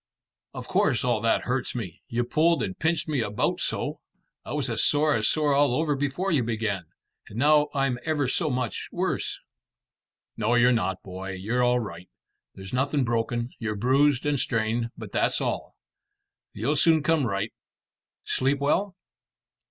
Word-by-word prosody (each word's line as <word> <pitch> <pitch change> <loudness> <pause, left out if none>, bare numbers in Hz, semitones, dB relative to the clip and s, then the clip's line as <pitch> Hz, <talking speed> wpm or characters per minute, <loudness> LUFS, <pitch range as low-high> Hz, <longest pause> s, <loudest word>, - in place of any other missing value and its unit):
"Of - - -7
course 115 - +2
all 120 -3 +1
that 115 - +2
hurts 130 +1 -2
me; 95 -8 -6
you 120 +1 -1
pulled 155 +3 +2
and 95 - -3
pinched 160 +1 0
me 145 -5 0
about 105 -2 -1
so. - - -2 0.4
I - - -6
was - - -1
as - - +1
sore 150 +1 +3
as 110 -4 +2
sore 150 -2 +2
all 140 -3 +3
over 150 -1 +1
before 145 +8 -1
you 150 -6 +3
began, 110 -5 -2 0.4
and 105 - -9
now 150 +2 +4
I'm 135 -3 0
ever 150 -4 0
so 155 +5 0
much 125 -3 -3
worse." - - -2 1.0
"No, 115 +2 +1
you're 120 +1 +5
not, 95 -6 -1
boy. 95 0 -6
You're 110 +7 -1
all 125 0 +3
right. 90 -6 -7 0.5
There's 95 +2 -10
nothing 140 +2 +1
broken. 120 +1 -1
You're 110 -3 -2
bruised 135 +5 +2
and 145 -2 +1
strained, 115 0 0
but - - -8
that's - - +1
all. - - -3 0.8
You'll 150 - -1
soon 160 +1 +4
come 155 -5 +2
right. 100 +1 -2 0.7
Sleep 135 +2 +1
well?" 185 +7 0
125 Hz, 165 wpm, -26 LUFS, 110-145 Hz, 1.0 s, you're